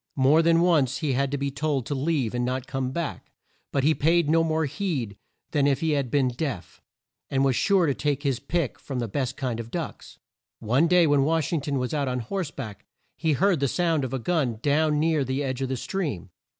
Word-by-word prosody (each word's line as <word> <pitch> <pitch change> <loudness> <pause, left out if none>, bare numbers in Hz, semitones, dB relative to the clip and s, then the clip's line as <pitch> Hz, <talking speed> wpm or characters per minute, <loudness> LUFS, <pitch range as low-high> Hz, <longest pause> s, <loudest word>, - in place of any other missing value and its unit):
More 140 +4 +5
than 165 0 +4
once 150 -7 +3
he 140 -1 -1
had 135 +2 +1
been 140 0 -1
told 140 -2 -1
to 145 - -3
leave 140 -4 0
and 120 0 -1
not 130 +1 -2
come 135 -1 -2
back, 160 +3 -4 0.4
but 140 - 0
he 155 +3 +4
paid 165 0 +2
no 165 0 +4
more 160 -1 0
heed 140 - -3 0.4
than 145 -2 +2
if 140 -2 +2
he 160 -1 +1
had 140 -4 0
been 135 0 +2
deaf, 125 - -5 0.5
and 135 0 +1
was 135 -2 +2
sure 195 - +3
to 140 - +1
take 145 0 -1
his 135 -4 0
pick 170 -6 -2
from 135 - -6
the 120 -2 -1
best 130 +4 -3
kind 125 -4 -2
of 115 0 -6
ducks. - - -6 0.4
One 125 +9 +2
day 175 0 +5
when 145 -2 +3
Wash 160 +2 0
ing 160 - +1
ton 140 0 -2
was 125 +1 -2
out 145 -2 0
on 125 -1 -1
horse 175 - -3
back 110 -9 -8 0.3
he 160 -2 0
heard 185 +2 +2
the 140 - +1
sound 165 0 +1
of 130 - -3
a 135 - -1
gun 130 -3 0
down 150 +1 +2
near 155 -2 +2
the 130 +2 -2
edge 130 -1 -3
of 135 - -1
the 130 - -2
stream. 125 - -4
140 Hz, 230 wpm, -25 LUFS, 130-160 Hz, 0.5 s, More